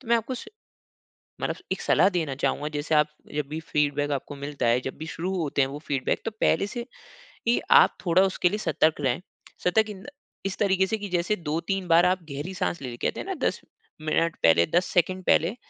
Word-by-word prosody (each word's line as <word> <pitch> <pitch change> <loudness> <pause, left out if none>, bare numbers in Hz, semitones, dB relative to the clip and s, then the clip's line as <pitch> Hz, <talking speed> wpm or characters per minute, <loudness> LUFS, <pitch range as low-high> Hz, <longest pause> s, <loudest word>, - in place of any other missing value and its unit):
तो 255 - -14
मैं 235 - +5
आपको 230 +3 -3
स - - -7 1.0
मतलब - - -1 0.2
एक - - -1
सलाह 190 - +4
देना 165 -7 -1
चाहूँगा 150 - 0
जैसे 150 +2 0
आप 150 0 +5 0.3
जब 150 -1 0
भी 155 +1 -4
फ़ीडबैक 145 -2 0
आपको 140 +1 -3
मिलता 140 -2 -4
है 120 +2 +4
जब 130 - -4
भी 160 - -6
शुरू 180 +4 -3
होते 150 -4 0
हैं 135 - +3
वो 145 +2 -6
फ़ीडबैक 135 -2 0
तो 225 - -1
पहले 200 - +3
से 240 +2 -5 0.6
ही 235 - +4 0.2
आप - - +4
थोड़ा 175 +2 +4
उसके 190 -2 +2
लिए 210 - -2
सतर्क 160 -7 +1
रहें। 130 +2 0 0.4
सतर्क 215 +5 +3
इन 200 -3 -8
द - - -12 0.4
इस 195 -1 -2
तरीक़े 190 -2 +3
से 220 - -1
कि 205 -1 -6
जैसे 180 +3 +1
2-3 175 +3 -2
बार 170 +1 +6
आप 185 +1 +2
गहरी 150 +7 -5
साँस 175 -3 -2
ले, 125 -3 -5
कहते - - -2
है - - -5
ना - - -3
10 - - -2 0.4
मिनट 160 +1 +1
पहले, 85 +1 +6
10 175 +1 +1
सेकंड 185 +2 +1
पहले 175 +8 +3
170 Hz, 220 wpm, -26 LUFS, 145-190 Hz, 1.0 s, बार